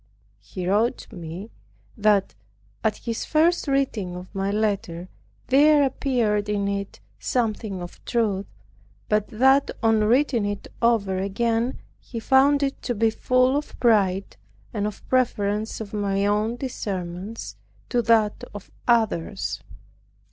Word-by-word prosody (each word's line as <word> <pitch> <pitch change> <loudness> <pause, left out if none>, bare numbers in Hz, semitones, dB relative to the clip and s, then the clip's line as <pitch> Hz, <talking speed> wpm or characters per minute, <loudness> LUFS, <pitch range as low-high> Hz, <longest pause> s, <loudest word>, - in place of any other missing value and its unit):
He 145 - -6
wrote 220 +6 +2
to - - -12
me, 175 +5 -7 0.4
that, 210 -3 +2 0.5
at 220 -1 +1
his 230 -2 -4
first 325 +2 +2
reading 250 -10 0
of 180 +1 -9
my 195 0 -1
letter 200 -4 -1 0.4
there 290 +2 +5
appeared 235 -6 0
in 200 -1 0
it 200 - -3 0.2
something 215 - -1
of 175 - -11
truth; 210 -5 0 0.6
but 210 -1 +2
that 265 +4 +4
on 225 -1 +4
reading 245 0 +3
it 205 -1 -4
over 210 -5 +2
again, 230 +5 0 0.2
he 230 - -7
found 275 +4 +4
it 275 -1 -2
to 245 - -2
be 225 +1 +2
full 255 +3 +2
of 295 +1 -4
pride, 195 - +2 0.4
and 205 0 -1
of 210 - -8
preference 215 -4 0
of 215 -2 -7
my 200 -1 0
own 210 +3 +1
discernments 190 - -5 0.3
to 240 - +2
that 225 -2 +2
of 205 - -9 0.2
others. 215 -5 +1
215 Hz, 135 wpm, -24 LUFS, 200-245 Hz, 0.6 s, there